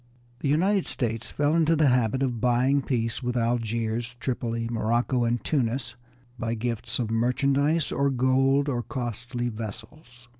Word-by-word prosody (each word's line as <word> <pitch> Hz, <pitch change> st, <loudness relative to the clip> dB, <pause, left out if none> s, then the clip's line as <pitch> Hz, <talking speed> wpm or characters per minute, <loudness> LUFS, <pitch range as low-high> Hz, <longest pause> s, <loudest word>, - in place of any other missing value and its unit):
The 140 Hz, -, -1 dB
United 185 Hz, +6 st, +2 dB
States 115 Hz, -2 st, -3 dB
fell 145 Hz, +1 st, +1 dB
into 165 Hz, 0 st, +3 dB
the 155 Hz, -3 st, +4 dB
habit 125 Hz, +1 st, +2 dB
of 120 Hz, -4 st, -1 dB
buying 125 Hz, +3 st, +3 dB
peace 115 Hz, -4 st, -1 dB
with 125 Hz, -1 st, -2 dB
Algiers, 115 Hz, 0 st, -1 dB
Tripoli, 115 Hz, -3 st, -2 dB
Morocco, 120 Hz, +2 st, +1 dB
and 115 Hz, -2 st, 0 dB
Tunis 125 Hz, -3 st, -1 dB, 0.4 s
by 115 Hz, 0 st, -1 dB
gifts 115 Hz, 0 st, -2 dB
of 115 Hz, -3 st, -2 dB
merchandise 140 Hz, +6 st, +1 dB
or 140 Hz, 0 st, +1 dB
gold 135 Hz, +2 st, +2 dB
or 125 Hz, -4 st, 0 dB
costly 120 Hz, -1 st, -4 dB
vessels. 120 Hz, +3 st, -9 dB
120 Hz, 145 wpm, -26 LUFS, 115-135 Hz, 0.4 s, the